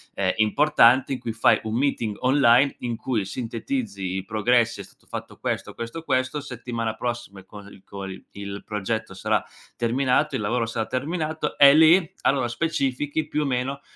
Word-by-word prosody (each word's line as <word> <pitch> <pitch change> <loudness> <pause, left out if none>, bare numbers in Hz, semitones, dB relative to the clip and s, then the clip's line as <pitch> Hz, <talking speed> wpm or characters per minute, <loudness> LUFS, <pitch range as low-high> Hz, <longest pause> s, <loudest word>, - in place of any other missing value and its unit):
ehm, 95 -2 +1
importante 130 +2 +4
in 130 - -3
cui 115 - -4
fai 115 - +4
un 110 0 -3
meeting 120 -6 0
online 130 0 +4
in 120 -1 -3
cui 115 -3 -2
sintetizzi 110 -4 -4
i 95 - -3
progressi: 115 +2 +1
"È - - -8
stato - - -23
fatto - - -7
questo, - - -3
questo, 115 +8 -6
questo", 130 0 0
settimana 120 -4 -4
prossima 120 -5 -5
col 100 -1 -13
col 95 -1 -8
il 100 0 -7
progetto 105 0 -3
sarà 95 - 0 0.3
terminato, 130 +4 +1
il 120 - -2
lavoro 115 +3 0
sarà 115 -1 -3
terminato, 155 +3 -3
e 140 -1 +9
lì, 160 +2 +5
allora 135 -3 +2
specifichi 145 +2 -1
più 150 - -1
o - - -2
meno 135 +1 -2
120 Hz, 165 wpm, -24 LUFS, 110-140 Hz, 0.3 s, e